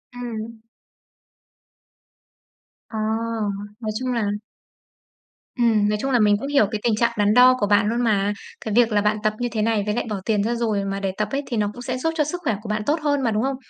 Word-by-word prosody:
Ừm. 230 Hz, -2 st, -6 dB, 2.3 s
À, 220 Hz, -, -6 dB, 0.8 s
nói 220 Hz, -2 st, -3 dB
chung 255 Hz, -1 st, -2 dB
là 230 Hz, -, 0 dB, 1.3 s
Ừm, 220 Hz, -4 st, +3 dB
nói 210 Hz, -, +1 dB
chung 270 Hz, -, -1 dB
là 245 Hz, -, +3 dB
mình 210 Hz, -1 st, +5 dB
cũng 275 Hz, -, -4 dB
hiểu 280 Hz, -6 st, +4 dB
cái 215 Hz, -, -2 dB
tình 230 Hz, -3 st, +2 dB
trạng 235 Hz, +1 st, +2 dB
đắn 205 Hz, 0 st, +3 dB
đo 250 Hz, +2 st, +7 dB
của 205 Hz, -, +1 dB
bạn 205 Hz, 0 st, +3 dB
luôn 235 Hz, +2 st, 0 dB
mà, 205 Hz, -2 st, +2 dB, 0.3 s
cái 215 Hz, -, -2 dB
việc 235 Hz, 0 st, +4 dB
là 205 Hz, -1 st, +3 dB
bạn 210 Hz, +1 st, +1 dB
tập 215 Hz, 0 st, +2 dB
như 245 Hz, 0 st, -1 dB
thế 220 Hz, -, -1 dB
này 220 Hz, -1 st, +1 dB
với 210 Hz, +1 st, -1 dB
lại -, -, -1 dB
bỏ 210 Hz, -, -2 dB
tiền 210 Hz, -3 st, +1 dB
ra 235 Hz, +3 st, 0 dB
rồi 215 Hz, -4 st, -1 dB
mà 195 Hz, 0 st, -3 dB
để 195 Hz, -1 st, -1 dB
tập 215 Hz, -, 0 dB
ấy 275 Hz, -, 0 dB
thì 235 Hz, -, -2 dB
nó 210 Hz, -1 st, +1 dB
cũng 245 Hz, -, -10 dB
sẽ 255 Hz, +1 st, -3 dB
giúp 325 Hz, +5 st, -1 dB
cho 300 Hz, -, +3 dB
sức 350 Hz, +5 st, -4 dB
khỏe 225 Hz, -9 st, +1 dB
của 215 Hz, -, -8 dB
bạn 215 Hz, 0 st, -1 dB
tốt 310 Hz, +2 st, +1 dB
hơn 290 Hz, -2 st, +1 dB
mà, 235 Hz, -4 st, +1 dB
đúng 215 Hz, +2 st, 0 dB
không? 270 Hz, 0 st, 0 dB
225 Hz, 235 wpm, -22 LUFS, 210-245 Hz, 2.3 s, đo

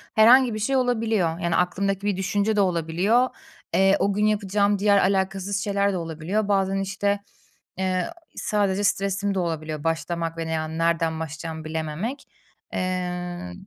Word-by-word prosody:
Herhangi 240 Hz, +2 st, +7 dB
bir 215 Hz, -, -3 dB
şey 270 Hz, +6 st, 0 dB
olabiliyor. 220 Hz, -9 st, +1 dB
Yani, 170 Hz, -1 st, 0 dB
aklımdaki 195 Hz, +2 st, 0 dB
bir 195 Hz, -2 st, 0 dB
düşünce 205 Hz, +3 st, 0 dB
de 205 Hz, -, +3 dB
olabiliyor. 185 Hz, +8 st, +2 dB, 0.4 s
Eee, 195 Hz, +1 st, +5 dB
o 200 Hz, -, +1 dB
gün 210 Hz, +1 st, +1 dB
yapacağım 205 Hz, -1 st, +1 dB
diğer, 205 Hz, 0 st, +4 dB
alakasız 195 Hz, 0 st, +1 dB
şeyler 200 Hz, -1 st, +1 dB
de -, -, -1 dB
olabiliyor. 165 Hz, +6 st, -2 dB
Bazen, 195 Hz, -1 st, +1 dB
işte, 200 Hz, +1 st, -1 dB, 0.6 s
eee, 185 Hz, -, 0 dB, 0.3 s
sadece 205 Hz, -1 st, 0 dB
stresim 195 Hz, 0 st, 0 dB
de -, -, +1 dB
olabiliyor 155 Hz, -3 st, -3 dB
başlamak 165 Hz, 0 st, -2 dB
ve 165 Hz, 0 st, -3 dB
ne -, -, -3 dB
yani 160 Hz, 0 st, -2 dB
nereden 165 Hz, -1 st, +1 dB
başlayacağımı 160 Hz, 0 st, -6 dB
bilememek. 160 Hz, -, -4 dB, 0.5 s
Eee. 180 Hz, -1 st, -3 dB
190 Hz, 150 wpm, -24 LUFS, 165-205 Hz, 0.6 s, Herhangi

